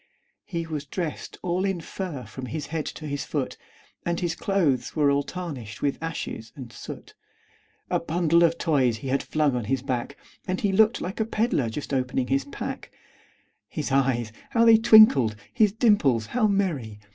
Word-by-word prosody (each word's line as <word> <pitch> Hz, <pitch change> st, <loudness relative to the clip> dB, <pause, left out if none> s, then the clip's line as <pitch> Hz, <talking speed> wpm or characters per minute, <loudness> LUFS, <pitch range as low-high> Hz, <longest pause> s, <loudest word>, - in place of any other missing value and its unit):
He 170 Hz, -3 st, -3 dB
was 155 Hz, -3 st, -5 dB
dressed 165 Hz, 0 st, -5 dB
all 180 Hz, +1 st, 0 dB
in 195 Hz, -3 st, 0 dB
fur 165 Hz, -5 st, -5 dB
from 130 Hz, -1 st, -8 dB
his 150 Hz, 0 st, -4 dB
head 160 Hz, -2 st, -2 dB
to 155 Hz, -, -7 dB
his 145 Hz, -1 st, -3 dB
foot, -, -, -3 dB, 0.5 s
And 170 Hz, 0 st, -1 dB
his 170 Hz, -2 st, -1 dB
clothes 160 Hz, -11 st, 0 dB
were 145 Hz, -3 st, +3 dB
all 140 Hz, 0 st, +2 dB
tarnished 140 Hz, -, -7 dB
with 140 Hz, +1 st, 0 dB
ashes 165 Hz, -8 st, -5 dB
and 125 Hz, -4 st, -9 dB
soot; -, -, -9 dB, 0.8 s
A -, -, +2 dB
bundle 170 Hz, 0 st, +2 dB
of 170 Hz, 0 st, +3 dB
toys 135 Hz, -10 st, +2 dB
he 130 Hz, +4 st, -6 dB
had 135 Hz, +1 st, +1 dB
flung 150 Hz, -4 st, +1 dB
on 120 Hz, -3 st, -2 dB
his 130 Hz, +3 st, -1 dB
back, 130 Hz, +1 st, -3 dB, 0.3 s
And 185 Hz, 0 st, -1 dB
he 200 Hz, -, +1 dB
looked 220 Hz, +4 st, +3 dB
like 185 Hz, +5 st, -5 dB
a -, -, +3 dB
peddler 215 Hz, -, 0 dB
just 140 Hz, +5 st, -5 dB
opening 130 Hz, -1 st, 0 dB
his 135 Hz, 0 st, +1 dB
pack; 140 Hz, -, -6 dB, 0.8 s
His 150 Hz, -2 st, -4 dB
eyes 125 Hz, -4 st, +1 dB, 0.2 s
how 230 Hz, 0 st, +3 dB
they 225 Hz, -1 st, +8 dB
twinkled! 215 Hz, -, +7 dB, 0.2 s
his 215 Hz, -4 st, +4 dB
dimples 195 Hz, -, +3 dB
how 235 Hz, -3 st, +3 dB
merry! 160 Hz, -, -1 dB
150 Hz, 180 wpm, -25 LUFS, 130-185 Hz, 0.8 s, they